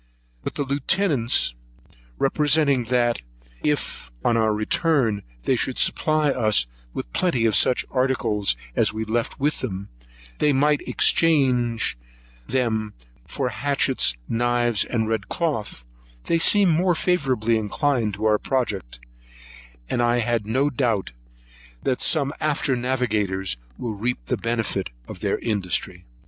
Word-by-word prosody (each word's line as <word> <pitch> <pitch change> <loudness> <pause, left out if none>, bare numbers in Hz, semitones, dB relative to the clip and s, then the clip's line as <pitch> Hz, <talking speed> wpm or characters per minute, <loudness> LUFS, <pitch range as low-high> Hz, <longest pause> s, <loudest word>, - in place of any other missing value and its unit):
But - - -4
on 140 - -1
the 135 - -1
Lieutenant's 140 - +1 0.6
representing, 140 -2 +2
that 120 0 +1 0.4
if, 150 - -2 0.2
on 120 - +3
our 110 -1 +2
return, 110 - +1 0.2
they - - +2
could - - -1
supply 155 -2 +2
us 110 - +2 0.3
with - - -6
plenty 145 -11 +1
of 110 -3 +2
such 125 - +3
articles 115 - +1 0.2
as - - +2
we 110 +1 -4
left 115 +2 -2
with 145 +2 0
them, 100 -5 -5 0.5
they 150 - +3
in 140 0 +2 0.2
exchange 125 - +2 0.5
would 110 -4 -1 0.3
receive 130 -3 -2
hatchets, 135 - +1
knives, 120 -1 +2
and 110 -3 -1
red 110 -3 -2
cloth, 115 - -2 0.4
they 165 - +1
seemed 195 +1 +5
more 175 +2 +2
favourably 130 -11 +1
inclined 110 0 0
to 105 +2 -4
our 105 -1 +3
project; 105 - -2 0.9
and 120 - 0
I 120 0 +2
have 120 -2 0
no 130 +7 +1
doubt 120 -7 0
but - - -26
that 130 - 0
some 140 -3 +2
after 145 -3 0
navigators 110 - -1 0.2
will 115 -3 -4
reap 105 - -3
the - - -1
benefit 115 - -2 0.2
of - - -9
their - - 0
industry. 90 -4 -2
120 Hz, 135 wpm, -23 LUFS, 105-140 Hz, 0.9 s, seemed